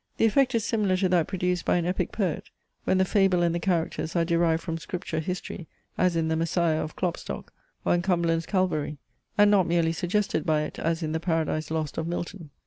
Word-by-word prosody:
The - - +4
effect 260 +3 +3
is 225 -2 +1
similar 205 -5 +1
to 185 0 +1
that 175 -3 +3
produced 180 -2 -1
by - - +2
an 170 - 0
Epic 180 +2 -1
Poet, 185 -8 -2 0.4
when 185 - +3
the 190 - +3
fable 190 -3 +3
and 170 -1 +2
the 170 - -1
characters 165 -2 -1
are 170 -1 +3
derived 165 -1 +2
from 165 -2 -3
Scripture 170 0 -4
history, 175 0 -5 0.3
as 180 -1 +2
in 165 -1 +1
THE 160 - +1
MESSIAH 165 -1 +1
of 155 - -7
Klopstock, 175 -2 -4 0.3
or - - +3
in 175 - +2
CUMBERLAND'S 170 -3 +1
CALVARY; 175 -6 0 0.4
and 205 0 +6
not 195 -4 +4
merely 165 -1 +2
suggested 195 +4 0
by 155 -3 +2
it - - -6
as 165 +1 -1
in 155 - -2
the 160 - -1
PARADISE 160 -2 -1
LOST 155 -1 -2
of 160 - -2
Milton. 175 -1 -5
175 Hz, 215 wpm, -27 LUFS, 165-185 Hz, 0.4 s, and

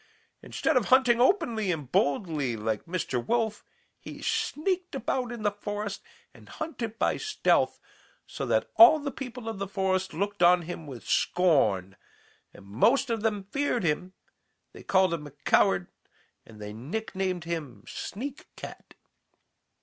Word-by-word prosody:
Instead 320 - -1
of 240 - +2
hunting 255 -2 +4
openly 240 - +2
and 150 -6 -5
boldly 145 - +1
like 110 0 -2
Mr. 165 -8 -2
Wolf, 225 - 0 0.4
he - - -9
sneaked 365 +1 -1
about 255 -2 -2
in 235 -3 -6
the 205 - +2
forest 205 0 -5 0.3
and - - -17
hunted 245 -9 -5
by - - +1
stealth, 430 -1 +1 0.5
so - - -6
that - - +1
all 340 -2 +10
the 290 -2 -4
people 250 -4 -7
of 220 -3 -4
the 200 - -3
forest 190 -1 0
looked 200 +3 -3
on 175 0 +6
him 165 -2 -7
with 125 -5 -9
scorn, 110 - +2 0.6
and - - -15
though 100 +2 -12
most 260 - +4
of 225 -2 -1
them 210 -3 0
feared 245 +3 -1
him, 175 +3 -1 0.6
they - - -11
called 190 -2 +3
him 150 -3 -4
a - - -12
coward 95 -3 +3 0.6
and 110 -2 -14
they 105 0 -7
nicknamed 185 - -3
him 150 -11 -5
'Sneak 270 +8 -6
cat.' - - -10
195 Hz, 150 wpm, -28 LUFS, 150-240 Hz, 0.6 s, all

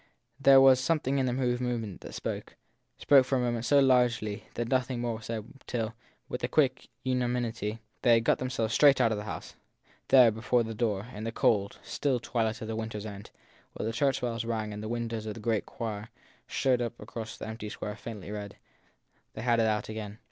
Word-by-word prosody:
There 135 -1 +8
was 135 -1 +7
something 140 -2 +1
in 130 - +1
her 125 - 0 0.3
movement 115 -6 -3
that - - -9
spoke - - -5 0.4
spoke 140 -2 +6
for 130 +1 0
a - - +1
moment 120 -1 -1
so 145 +2 +5
largely 125 -6 +2
that 120 0 -2
nothing 130 -1 0
more 120 -2 -2
was 110 - -12
said 110 -2 -4 0.2
till, 115 -2 -2 0.3
with - - -5
a - - +2
quick 135 -4 +1 0.2
unanimity, 120 -4 -1 0.2
they 120 -1 +6
had 115 - +2
got - - +3
themselves 125 -4 -1
straight 140 -3 +6
out 115 -3 +4
of 105 - -1
the 105 - -6
house. 90 -6 -6 0.5
There, 125 -4 +7
before 115 +2 +1
the 115 0 -5
door, 105 -3 -1
in 105 - -6
the 115 - -2
cold, 100 -3 +1
still 135 -4 0
twilight 115 -2 -1
of - - -5
the 110 - -3
winter 110 -1 -4
s 105 - -6
end, 100 -1 -8 0.4
while - - -4
the 115 - -2
church 135 +2 +1
bells 115 -2 -2
rang 110 -2 -2
and 105 - -6
the 110 - -5
win 120 0 -2
dows 110 -1 -4
of 105 - -4
the - - -8
great 110 -1 -1
choir 110 -1 -5 0.4
showed 125 -2 +1
across 115 -1 -5
the - - -6
empty 110 -1 -6
square 105 0 -5
faintly 105 -3 -8
red, 105 -1 -6 0.8
they 110 - -6
had 120 -1 +3
it 110 - +3
out 105 -1 0
again. 110 -1 -6
115 Hz, 215 wpm, -29 LUFS, 110-125 Hz, 0.8 s, There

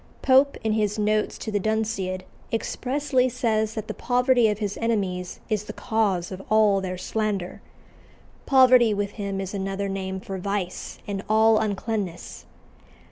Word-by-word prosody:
Pope, 270 +1 +4
in 220 - +1
his 210 -1 0
notes 215 0 0
to 220 - -5
the 205 - +1
Dunciad, 205 -3 -1 0.3
expressly 255 +3 0
says 220 -3 0
that 220 -1 -4
the 215 - -4
poverty 250 -1 +3
of 210 -1 0
his 205 -2 -3
enemies 195 -6 -2
is 215 -2 -1
the - - -7
cause 205 -7 0
of 190 0 -6
all 215 -2 +4
their 185 -1 -4
slander. 200 -2 -3 0.9
Poverty 255 -4 +6
with 200 0 -2
him 200 -2 -4
is 195 0 -4
another 195 0 -2
name 190 -1 -3
for 190 0 -6
vice 195 -1 -3
and 200 -1 -3
all 220 0 +5
uncleanness. 205 -3 -3
210 Hz, 150 wpm, -25 LUFS, 195-225 Hz, 0.9 s, Poverty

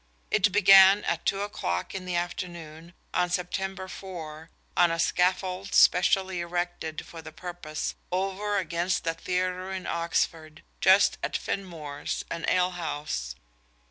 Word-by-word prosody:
It 205 -1 +3
began 195 0 +7
at 170 - -2
two 195 0 +1
o'clock 90 - -3
in 190 -1 -5
the 180 -1 -3
afternoon 175 -2 -5 0.2
of 180 -1 +1
September 190 +1 -3
4 165 -5 -8 0.3
on 175 - +5
a 165 - -1
scaffold 185 +3 0
specially 190 0 +4
erected 175 -2 -3
for 165 - -10
the 160 0 -10
purpose 170 -2 -5 0.2
"over 195 +3 -1
against 175 0 -1
the 165 - 0
Theatre 185 +2 -2
in 190 -1 -5
Oxford... 165 -2 -2 0.2
just - - +5
at - - -1
Finmore's, 155 -7 -4
an 170 - -3
alehouse." 160 - -1
180 Hz, 130 wpm, -27 LUFS, 165-190 Hz, 0.3 s, began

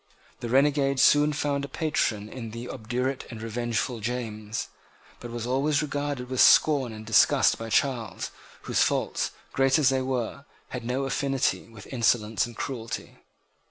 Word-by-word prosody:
The 120 - -5
renegade 140 +1 +3
soon 145 +2 +5
found 145 -1 -1
a - - -3
patron 120 -10 -1
in 115 0 -7
the 115 +2 -7
obdurate 125 +3 -3
and 115 - -8
revengeful 115 +1 -2
James, 110 -2 -4 0.5
but 120 - -8
was 120 -1 -5
always 140 +4 +1
regarded 145 -3 -3
with 130 0 +1
scorn 140 -6 +5
and 110 0 -9
disgust 110 -1 +4
by 115 0 -5
Charles, 120 -2 0 0.3
whose - - +1
faults, - - +1 0.2
great 135 +1 +3
as 145 -5 +4
they 135 -1 +1
were, 130 +1 -3 0.2
had 125 -2 -5
no 125 +3 -1
affinity 135 -2 0
with 110 -2 -12
insolence 115 -2 +1
and 120 - -11
cruelty. 115 -4 -5
125 Hz, 155 wpm, -26 LUFS, 115-135 Hz, 0.5 s, soon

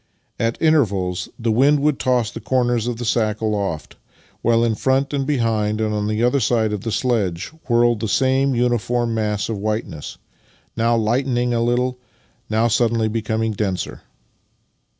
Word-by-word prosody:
At 115 0 -1
intervals 100 - +1
the 115 -1 -1
wind 140 +6 +4
would 150 -1 +1
toss 125 -3 +1
the - - -7
corners 120 -3 0
of 120 -2 -2
the 120 - -5
sack 110 -2 0
aloft, 100 -7 -3 0.4
while 115 0 +3
in 115 -1 +2
front 135 +5 0
and 135 -1 -1
behind 110 -6 0
and 110 -1 0
on 105 0 -1
either 120 +5 +2
side 110 -3 +1
of 105 - -3
the 115 - -3
sledge 105 -8 -1 0.2
whirled 120 -1 +3
the 110 - -2
same 135 +3 +2
uniform 120 0 0
mass 105 -2 -1
of 110 -3 -3
whiteness 105 -8 -4 0.3
— - - -35
now 115 +1 +2
lightening 120 +2 0
a 115 - +1
little, 125 +1 0 0.5
now 110 +2 +2
suddenly 115 -1 +1
becoming 110 0 -1
denser. 100 -3 -3
115 Hz, 160 wpm, -21 LUFS, 110-125 Hz, 0.5 s, wind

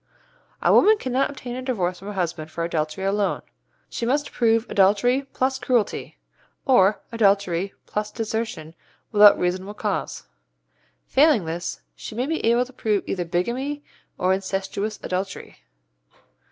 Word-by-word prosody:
A - - +5
woman 435 +1 +6
cannot 260 -4 0
obtain 255 -3 -7
a 255 - -4
divorce 185 -9 -2
from 195 - -10
her 205 - -5
husband 170 -4 -3
for 165 +1 -4
adultery 160 +1 -2
alone. 200 -1 0 0.4
She - - -6
must 285 +5 0
prove 230 -1 +2
adultery 215 +8 +3
plus 265 0 0
cruelty, 245 -6 -1 0.5
or 210 -6 +4
adultery 200 -4 +1
plus 210 0 -3
desertion 220 -8 -4 0.4
without 210 -1 +8
reasonable 185 +3 -2
cause. 210 -5 -3 0.8
Failing 275 - +4
this, 165 - -4
she - - -8
may 245 +3 0
be 320 +2 -2
able 235 +2 +3
to 260 - -16
prove 215 -4 0
either 180 -2 -2
bigamy 250 +12 -2 0.3
or 185 +1 +2
incestuous 195 +2 -3
adultery. 190 +2 -4
210 Hz, 140 wpm, -23 LUFS, 185-245 Hz, 0.8 s, without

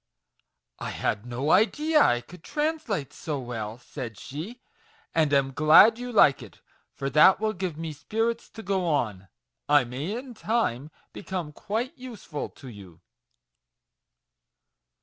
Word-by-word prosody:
" - - -56 0.3
I - - -4
had 105 +4 -2
no 130 +5 -1
idea 300 +9 +4
I 120 0 +3
could 165 +7 -15
translate 295 - -2
so 150 -3 -4
well," 115 -3 -5
said 120 -3 -8
she, 170 - -7 0.5
"and 155 -3 +2
am 135 -1 +2
glad 160 - +7
you 245 0 -5
like 170 - +5
it, - - -13 0.4
for 135 - -3
that 155 +8 +6
will 215 0 0
give 185 -5 -4
me 160 -1 -5
spirits 225 +9 -2
to 220 - -7
go 190 -1 0
on: 110 - -1 0.4
I 145 -2 +6
may, 140 - -4
in 255 0 -8
time, 210 - -1 0.2
become 185 -6 -5
quite 220 - -3
useful 230 - -6
to 135 - -14
you." 95 -7 -12
155 Hz, 145 wpm, -26 LUFS, 130-220 Hz, 0.5 s, glad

